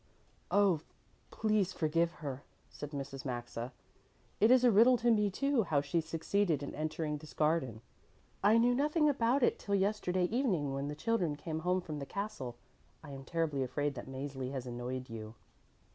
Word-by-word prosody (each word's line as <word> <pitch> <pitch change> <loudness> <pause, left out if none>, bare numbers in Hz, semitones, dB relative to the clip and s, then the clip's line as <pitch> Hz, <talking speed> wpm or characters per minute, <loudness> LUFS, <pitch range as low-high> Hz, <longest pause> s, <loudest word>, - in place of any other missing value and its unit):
"Oh, 195 -6 +3 0.5
please 215 -4 +1
forgive 165 +1 +1
her," 135 -1 -4 0.3
said 145 - -7
Mrs. 140 -2 -6
Maxa. 120 -1 -4 0.7
"It 220 - +5
is 255 0 +6
a 245 - +6
riddle 235 +5 +6
to 240 +1 +3
me, 210 -2 +3
too, 275 +5 +1
how 155 -8 +1
she 145 +4 0
succeeded 165 0 0
in 140 - -5
entering 155 0 -2
this 155 +1 -13
garden. 150 -8 +1 0.6
I 210 +3 +6
knew 240 +2 +4
nothing 300 +4 +2
about 260 -1 +2
it - - +3
till 200 - -1
yesterday 190 -2 +1
evening 185 - 0
when 135 +1 -2
the 150 - -4
children 180 -5 0
came 160 +1 -4
home 180 +3 +1
from 155 -4 -6
the 140 - -6
castle. 200 - -4 0.5
I 145 - -9
am 135 -1 -8
terribly 160 -4 -1
afraid 140 +3 -1
that 120 - -8
Mäzli 135 -1 -5
has 130 -2 -4
annoyed 125 +1 -4
you." 110 -1 -8
160 Hz, 175 wpm, -33 LUFS, 140-210 Hz, 0.7 s, is